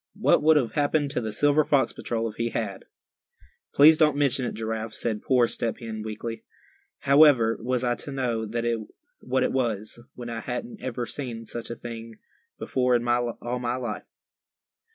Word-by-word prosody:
what - - +3
would 155 +1 +5
have 120 -6 +1
happened 145 -1 +1
to 130 - -1
the 110 -1 -3
Silver 145 +7 +3
Fox 145 -2 +2
Patrol 115 -1 -2
if 110 - -8
he 115 0 -1
had?" 105 -4 -4 0.9
"Please 155 +2 +7
don't 150 -3 +4
mention 135 -3 +1
it, - - -5
Giraffe," 110 0 -4
said 110 -3 -2
poor 125 -3 +3
Step 115 0 -2
Hen, 110 -2 -6
weakly, 110 +1 -6 0.6
"However 140 -6 +5
was 125 +1 -1
I 120 -1 +2
to 140 - -7
know 120 -5 -2 0.7
what 130 +1 0
it - - +1
was, 115 -4 -2 0.2
when 120 -1 -7
I 115 - -4
hadn't 210 - -5
ever 120 -1 -3
seen 120 -5 -5
such 115 +1 -6
a 120 - -4
thing 115 -1 -8 0.4
before 125 -1 +1
in 120 0 0
all 120 0 -1
my 120 0 -1
life?" 120 -4 -6
120 Hz, 175 wpm, -26 LUFS, 115-135 Hz, 0.9 s, Please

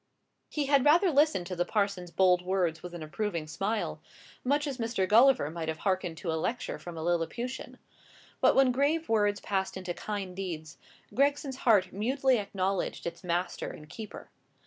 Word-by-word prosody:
He 295 -2 -1
had 280 -1 +4
rather 340 +6 +5
listened 290 - +3
to 180 +1 -5
the 175 - +1
parson's 200 -3 -1
bold 180 0 +4
words 180 -3 0
with 175 -1 -8
an 165 - -6
approving 170 +1 -3
smile, 200 +8 -2 0.4
much 290 +3 +1
as 275 -3 -4
Mr. 225 -5 0
Gulliver 230 - +5
might 165 -1 -5
have 160 0 -2
hearkened 185 -3 -1
to 165 0 -3
a 160 - -1
lecture 245 +7 -2
from 175 -2 -8
a 160 - -4
Lilliputian. 175 +10 -2 0.6
But - - +4
when 270 -1 +5
brave 290 +6 +1
words 205 -2 +2
passed 190 -1 -2
into 185 -2 -4
kind 195 -2 -5
deeds, 165 -5 -6 0.3
Gregson's 280 0 +1
heart 205 -8 +3
mutely 255 +4 +2
acknowledged 195 -2 -2
its 170 +2 -5
master 175 +1 -2
and 150 - -10
keeper. 215 +7 -9
195 Hz, 170 wpm, -29 LUFS, 175-255 Hz, 0.6 s, rather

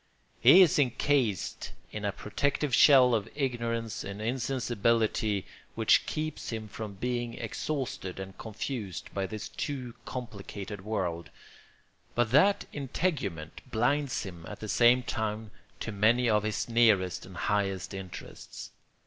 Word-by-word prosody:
He 190 +2 +9
is 165 - +3
encased 125 - 0 0.2
in 105 -1 -5
a 100 - +1
protective 140 +7 -1
shell 130 -2 +7
of 110 -1 0
ignorance 115 -5 -2
and 100 +1 -6
insensibility 115 -4 0 0.3
which - - +4
keeps 155 0 -3
him 110 -2 -4
from 105 0 -7
being 120 +2 -2
exhausted 115 -5 -4
and 95 0 -7
confused 110 - -5
by 95 -1 -1
this 110 +2 -6
too 130 -4 -4
complicated 105 -4 -7
world; 90 -6 -2 0.9
but 120 -2 +2
that 190 +10 +4
integument 135 - -3
blinds 140 +4 +1
him 90 -5 -9
at 105 - -8
the 110 - -6
same 120 +3 +5
time 110 -2 -3 0.3
to 115 - -3
many 110 +4 +3
of 105 -2 +3
his 110 0 -2
nearest 110 -6 +3
and 95 -1 -11
highest 100 -2 -1
interests. 95 -2 -8
110 Hz, 130 wpm, -29 LUFS, 100-125 Hz, 0.9 s, He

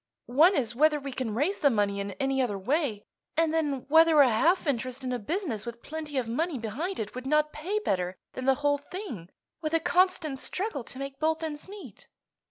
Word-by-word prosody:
One 315 +10 +5
is, 240 -6 0
whether 300 +4 +3
we 275 -1 -6
can 250 -4 -3
raise 325 - 0
the 290 - +5
money 205 -4 +1
in 200 0 -4
any 270 +4 0
other 220 -6 -1
way; 240 - -1 0.3
and 325 -1 +3
then, 290 -5 0
whether 320 +1 +6
a 280 - +8
half 330 - +3
interest 255 -1 -1
in 255 -1 -2
a 245 - -2
business 265 - -2
with 235 -1 -8
plenty 305 -2 -5
of 250 -3 0
money 310 +6 -1
behind 270 - -4
it 215 -1 -4
would 255 +1 -6
not 300 +1 +2
pay 360 +8 -2
better 185 - -1 0.2
than 255 - -5
the 270 0 +4
whole 285 0 +3
thing, 285 - -7 0.3
with 315 0 -1
a - - +4
constant 350 -5 +1
struggle 380 -3 -3
to - - -7
make 275 0 -6
both 320 +1 0
ends 300 0 -5
meet." 380 - -11
280 Hz, 210 wpm, -28 LUFS, 240-320 Hz, 0.3 s, a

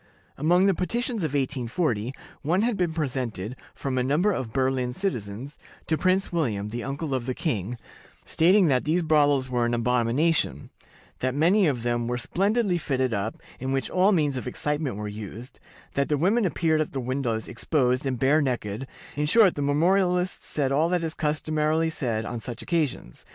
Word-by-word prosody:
Among 175 +6 +3
the 195 - +4
petitions 230 +6 -2
of 155 -3 -2
1840, 130 -3 -1 0.3
one 175 +7 +1
had 240 -1 +1
been 180 -3 0
presented 125 - -3 0.2
"from 130 -2 -2
a - - +1
number 155 +11 +2
of 130 - -3
Berlin 130 -1 0
citizens" 125 - -4 0.3
to 160 - +1
Prince 185 +3 +1
William, 110 - -1
the 120 +2 -4
uncle 140 +2 -3
of 130 -2 -2
the 130 - -2
king, 120 - -2 0.5
stating 185 +4 +4
that 130 -5 +2
these 170 +3 +1
brothels 145 -4 +3
were 125 -2 0
an 120 0 +1
abomination; 120 - +1 0.5
that 130 +1 -1
many 180 +6 +4
of 125 -6 -1
them 120 -1 0
were 125 0 -1
splendidly 195 - +1
fitted 130 -5 0
up, 105 +2 -3 0.2
in 130 +1 -3
which 135 -2 -1
all 185 +3 +4
means 150 -7 +1
of 125 - -5
excitement 150 0 -2
were 105 +1 -4
used; 105 +3 -8 0.3
that 140 0 0
the 150 - +2
women 200 +9 +2
appeared 160 -2 +1
at 155 - -3
the 135 - -2
windows 125 -3 -2
exposed 125 0 0
and 135 -2 -1
bare 140 +5 +3
necked; 125 -2 -2 0.3
in 150 +1 0
short, 205 +2 +6
the 145 - -4
memorialists 180 +5 +1
said 140 -3 0
all 155 +4 +2
that 180 -1 0
is 160 -1 -2
customarily 155 +1 0
said 115 -8 -2
on 120 0 -4
such 120 +1 -6
occasions. 155 - -2
140 Hz, 180 wpm, -26 LUFS, 125-165 Hz, 0.5 s, short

